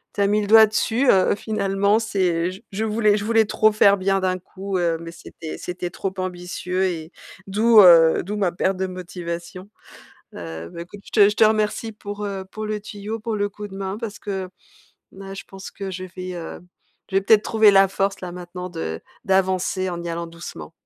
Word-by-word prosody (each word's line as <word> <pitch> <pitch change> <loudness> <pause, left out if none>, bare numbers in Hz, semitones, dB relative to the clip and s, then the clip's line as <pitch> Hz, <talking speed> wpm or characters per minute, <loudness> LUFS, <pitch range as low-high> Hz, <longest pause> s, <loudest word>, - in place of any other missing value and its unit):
tu - - -1
as 200 - +4
mis 210 +1 +2
le 205 - -3
doigt 220 +1 +8
dessus, 230 +4 +1
heu, 190 -1 +4
finalement. 200 -1 +1
C'est, 195 -5 0 0.2
heu, - - -1
j 190 +4 -12
je 210 +3 -2
voulais 215 -1 +2
je 205 - -4
voulais 225 0 +4
trop 215 +1 +3
faire 200 -1 +5
bien 195 0 +1
d'un 185 0 0
coup, 190 +1 -5
heu, 170 -2 +1
mais 165 0 -8
c'était 160 -1 -9
c'était 180 0 -5
trop 190 +2 -4
ambitieux 180 0 -3
et 165 -3 -4 0.4
d'où, 215 +3 +6
heu, 165 -3 +7
d'où 210 +4 -4
ma 190 -4 0
perte 190 +2 0
de 190 0 -1
motivation. 180 0 -7 0.7
Heu, 80 0 -7
bah, 170 - -9
écoute, 200 +4 -12
je - - -12
te 205 -3 +6
je 210 - -3
te - - +6
remercie 215 +1 +1
pour, 205 -1 -7
heu, 195 -1 -4
pour 215 +1 -5
le 215 0 -3
tuyau, 210 +1 -6
pour 220 0 -3
le 205 0 0
coup 210 +1 -8
de 195 - -10
main, 195 +1 -4
parce 225 -3 -6
que 190 -2 -4 0.6
là, 195 0 -9
je 195 - -8
pense 195 0 -9
que 195 -1 -6
je 185 0 -6
vais 185 0 -5
heu, 170 -1 -7 0.5
je 190 - -5
vais - - +3
peut-être 210 +2 +4
trouver 220 -2 +5
la 195 0 +6
force, 195 +1 -2
là, 180 -1 -5
maintenant, 180 +1 -7
de 85 - -5 0.2
d'avancer 190 -1 +1
en 175 -1 -5
y 170 - -4
allant 170 0 -4
doucement. 165 - -9
195 Hz, 215 wpm, -22 LUFS, 180-210 Hz, 0.7 s, doigt